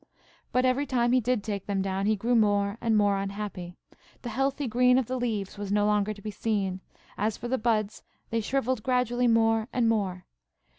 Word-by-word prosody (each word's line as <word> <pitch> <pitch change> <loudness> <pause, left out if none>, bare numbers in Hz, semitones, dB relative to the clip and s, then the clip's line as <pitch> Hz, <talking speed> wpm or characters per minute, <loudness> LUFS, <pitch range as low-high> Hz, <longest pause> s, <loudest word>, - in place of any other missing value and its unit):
But 255 +1 +2
every 260 +3 +1
time 240 -2 +1
he 255 - +4
did 240 -2 0
take 205 -3 -4
them 195 -2 0
down, 195 +1 -1
he 215 - +3
grew 230 +4 -1
more 205 -1 +2
and 225 -2 +2
more 205 -1 +3
unhappy. 195 -3 -5 0.5
The 240 - -4
healthy 270 +4 -1
green 250 +2 +4
of 260 - +1
the 255 - -3
leaves 210 -5 -3
was 205 -1 -4
no 205 0 +2
longer 210 0 +1
to 200 -2 -9
be 215 - -4
seen; 200 -3 -2 0.4
as 210 +1 0
for 240 - -6
the 260 +2 -1
buds, 215 -2 0 0.3
they 230 0 0
shrivelled 260 0 -1
gradually 250 0 +1
more 225 -1 +3
and 240 -2 +1
more. 195 -5 -1
220 Hz, 200 wpm, -27 LUFS, 205-245 Hz, 0.5 s, he